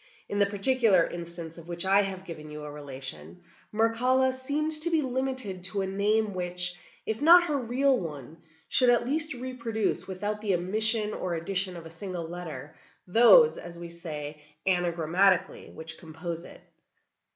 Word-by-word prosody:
In 205 - -3
the 200 - +4
particular 205 -3 +5
instance 170 -1 -7
of 165 - -14
which 175 +1 -3
I 195 +1 +4
have 190 -1 -5
given 155 -3 -9
you 150 0 -8
a 150 - -7
relation, 130 - -7 0.3
Mircalla 250 +4 +2
seemed 285 +4 -2
to 340 - +4
be 320 -3 +1
limited 255 -7 -2
to 195 +1 -1
a - - -2
name 205 +2 0
which, 180 0 0 0.3
if 220 +3 -3
not 345 +3 +8
her 300 -4 -1
real 260 +3 +1
one, 150 -3 -8 0.3
should 250 -1 +7
at 240 -1 +3
least 300 +2 0
reproduce, 235 -4 -3
without 205 +3 -4
the 200 -4 +1
omission 215 +4 0
or 175 -2 -3
addition 185 +2 -2
of 165 - -10
a 165 - -10
single 175 0 -6
letter, 160 -5 -8 0.3
those, 240 - +6
as 170 -1 -10
we 170 0 -8
say, 150 -3 -7 0.2
anagrammatically, 180 +1 +1
which 160 0 -8
compose 165 +1 -7
it. - - -14
190 Hz, 165 wpm, -27 LUFS, 170-235 Hz, 0.3 s, not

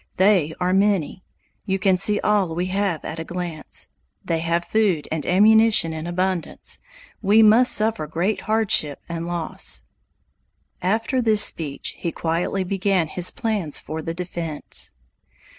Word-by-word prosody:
They 185 -5 +3
are 180 0 +1
many. 195 -3 +1 0.4
You 190 0 +1
can 190 0 +2
see 205 +3 +3
all 200 -6 +1
we 175 +2 -1
have 195 -5 -1
at 160 - -5
a - - -3
glance. 170 -2 -5 0.4
They 165 -1 0
have 170 +1 -1
food 200 -8 +1
and 155 -2 -3
ammunition 215 -2 +4
in 160 +1 -5
abundance. 180 0 -2 0.4
We 215 +2 +5
must 225 +4 +6
suffer 215 -7 +1
great 175 +7 -1
hardship 215 -10 +1
and 170 0 -5
loss." 175 -2 -2 1.0
After 225 +7 0
this 220 -3 +5
speech, 145 -4 0
he 170 - -2
quietly 170 +4 -2
began 190 -3 0
his 180 +2 +2
plans 210 - -2
for 160 +1 -6
the 165 +1 -5
defense. 170 -3 -5
180 Hz, 140 wpm, -22 LUFS, 165-210 Hz, 1.0 s, must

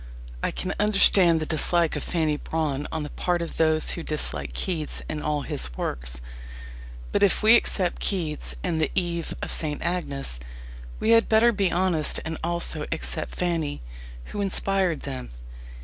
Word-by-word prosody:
I - - 0
can 185 - -3
understand 195 -5 +6
the 155 - -2
dislike 165 +2 +1
of - - -3
Fanny 160 -3 0
Brawne 150 -2 -2
on 160 -1 -3
the 150 - -7
part 175 -1 0
of 170 -1 -5
those 155 -1 +4
who 170 - -3
dislike 155 -2 -2
Keats 165 -5 -1
and 155 -1 -4
all 150 -1 -1
his - - -3
works. - - -3 0.9
But - - +1
if 200 +1 +3
we 220 +2 +8
accept 185 -6 +2
Keats 165 -7 -1
and 165 -3 -1
The 155 - +1
Eve 170 -3 -1
of - - -3
St. 150 -2 -1
Agnes, 140 - -3 0.6
we 220 - +2
had 230 0 +5
better 225 +2 +5
be 200 -4 0
honest 175 -4 +1
and 160 0 -4
also 170 -2 -2
accept 160 - -2
Fanny, 165 - -2 0.4
who 205 - -5
inspired 195 -3 0
them. 130 - -6
165 Hz, 165 wpm, -25 LUFS, 150-185 Hz, 0.9 s, we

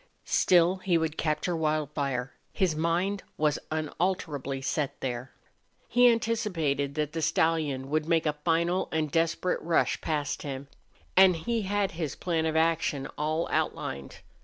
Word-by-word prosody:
Still 180 +1 +4
he 185 -2 +1
would 160 -1 -1
capture 155 +3 -1
Wildfire; 150 -5 -1 0.2
his 180 -5 +1
mind 175 +5 0 0.2
was 150 -1 +1
unalterably 155 -3 -2
set 140 +1 -2
there. 125 0 -4 0.6
He 245 0 +6
anticipated 175 -12 -1
that 150 -1 -1
the 165 - -2
stallion 155 -5 +1
would 155 0 0
make 165 -1 +2
a 150 - +2
final 170 +2 +1
and 155 -2 -1
desperate 165 +3 +1
rush 165 -1 +1
past 145 -2 -2
him; 140 -1 -6 0.5
and 190 -1 +7
he 230 +8 -1
had 205 -1 +1
his 160 -5 -4
plan 165 -3 -1
of 160 - -1
action 160 -4 +1
all 155 +2 -1
outlined. 70 0 -2
160 Hz, 140 wpm, -28 LUFS, 145-175 Hz, 0.6 s, and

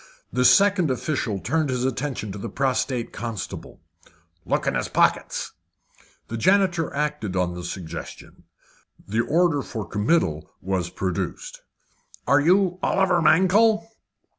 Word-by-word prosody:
This 125 0 +5
second 195 -5 +4
official 125 -5 -2
turned 145 - -1
his 125 -1 -1
attention 130 -4 -3
to 100 - -7
the - - -5
prostrate 130 -2 -1
constable. 115 -5 -6 0.7
"Look - - 0
in - - +1
his - - -1
pockets." - - +1 0.8
The 115 - -5
janitor 180 - +2
acted 150 -9 -2
on 90 -1 0
the 90 0 -7
suggestion. 85 -3 -8 0.6
The 110 +3 +1
order 165 -1 +2
for 110 -7 -6
committal 105 - 0
was 95 -2 -2
produced. 300 - -4 0.6
"Are - - +4
you 180 +3 +3
Oliver 185 -3 +2
Mankell?" 205 +7 +4
135 Hz, 125 wpm, -24 LUFS, -, 0.8 s, This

